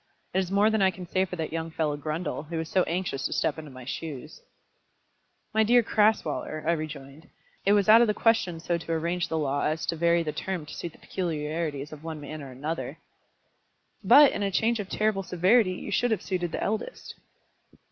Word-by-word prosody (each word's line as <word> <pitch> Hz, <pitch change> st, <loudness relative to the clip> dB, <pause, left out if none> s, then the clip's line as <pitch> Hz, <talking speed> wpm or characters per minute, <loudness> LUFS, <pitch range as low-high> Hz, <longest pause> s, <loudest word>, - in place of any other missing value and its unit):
It 190 Hz, -, +2 dB
is 185 Hz, -2 st, -1 dB
more 200 Hz, +3 st, +3 dB
than 220 Hz, -2 st, +1 dB
I 190 Hz, -, +5 dB
can 185 Hz, 0 st, -7 dB
say 185 Hz, +2 st, +1 dB
for 180 Hz, -, -6 dB
that 160 Hz, -2 st, -4 dB
young 165 Hz, 0 st, -3 dB
fellow 155 Hz, -2 st, -1 dB
Grundle, 155 Hz, +2 st, -4 dB
who 165 Hz, 0 st, -3 dB
is 160 Hz, -, -3 dB
so 185 Hz, -, +3 dB
anxious 170 Hz, -5 st, -2 dB
to -, -, -4 dB
step 160 Hz, -, 0 dB
into 155 Hz, -2 st, -9 dB
my 130 Hz, -2 st, -11 dB
shoes." 150 Hz, +1 st, -6 dB, 1.1 s
"My 220 Hz, -, +3 dB
dear 240 Hz, +2 st, +5 dB
Crasweller," 210 Hz, -8 st, +1 dB
I 165 Hz, -, +3 dB
rejoined, 155 Hz, -2 st, -6 dB, 0.4 s
"it 200 Hz, -, +6 dB
was 205 Hz, -1 st, +3 dB
out 220 Hz, +2 st, +8 dB
of 240 Hz, -, +5 dB
the 210 Hz, -, +1 dB
question 225 Hz, -7 st, +2 dB
so 170 Hz, +1 st, -1 dB
to 165 Hz, 0 st, -4 dB
arrange 170 Hz, +2 st, -1 dB
the 160 Hz, -, -2 dB
law 145 Hz, -2 st, 0 dB
as 155 Hz, +1 st, -1 dB
to 165 Hz, -, -1 dB
vary 170 Hz, +1 st, +2 dB
the 155 Hz, -, -2 dB
term 180 Hz, -1 st, -4 dB
to -, -, -10 dB
suit 170 Hz, -2 st, -6 dB
the -, -, -17 dB
peculiarities 155 Hz, -4 st, -3 dB
of 155 Hz, 0 st, -11 dB
one 160 Hz, -1 st, -5 dB
man 150 Hz, +1 st, -7 dB
or 140 Hz, -, -8 dB
another." 150 Hz, +6 st, -4 dB, 1.1 s
"But 290 Hz, -1 st, +8 dB
in -, -, -4 dB
a 200 Hz, -, +1 dB
change 225 Hz, +4 st, +1 dB
of 205 Hz, -, -4 dB
such -, -, -5 dB
terrible 215 Hz, -2 st, +1 dB
severity 185 Hz, +3 st, +3 dB
you -, -, -7 dB
should 245 Hz, -, +2 dB
have 220 Hz, -, -1 dB
suited 175 Hz, -3 st, -2 dB
the -, -, -3 dB
eldest." 220 Hz, -, -4 dB
170 Hz, 220 wpm, -27 LUFS, 155-195 Hz, 1.1 s, out